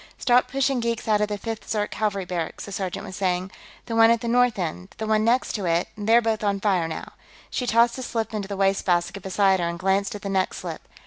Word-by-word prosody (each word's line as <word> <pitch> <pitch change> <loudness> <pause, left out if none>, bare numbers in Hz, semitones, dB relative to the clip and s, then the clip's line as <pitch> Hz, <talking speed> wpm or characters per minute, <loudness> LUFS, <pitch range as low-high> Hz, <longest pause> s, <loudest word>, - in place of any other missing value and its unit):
"Start 250 -1 +3
pushing 275 -1 0
geeks 235 0 -2
out 210 -1 +3
of 210 - +2
the 205 0 -3
Fifth 225 +2 -6
Zirk 210 -1 -1
Cavalry 200 -3 -1
barracks," 175 -3 -4
the 200 - -9
sergeant 190 +1 -4
was 190 -2 -8
saying. 185 -1 -1 0.3
"The 230 - -4
one 225 0 +7
at 230 -1 +3
the 235 - -4
north 245 -1 +3
end, 170 -4 -1
and 185 +2 -14
the 220 - -3
one 215 0 +2
next 240 +3 +2
to 205 -4 -3
it; 170 +1 +1
they're 225 +3 +3
both 220 -1 0
on 200 -1 +1
fire, 190 -5 +1
now." 160 - -6 0.4
She 250 - -2
tossed 235 +2 +3
a - - -4
slip 225 -3 -3
into 205 -2 -3
the 200 -1 -5
wastebasket 195 -1 +1
beside 190 0 +2
her 170 -1 0
and 170 - -4
glanced 195 +4 0
at 205 - -8
the 200 - -3
next 190 -1 0
slip. - - -6
205 Hz, 250 wpm, -24 LUFS, 190-230 Hz, 0.4 s, one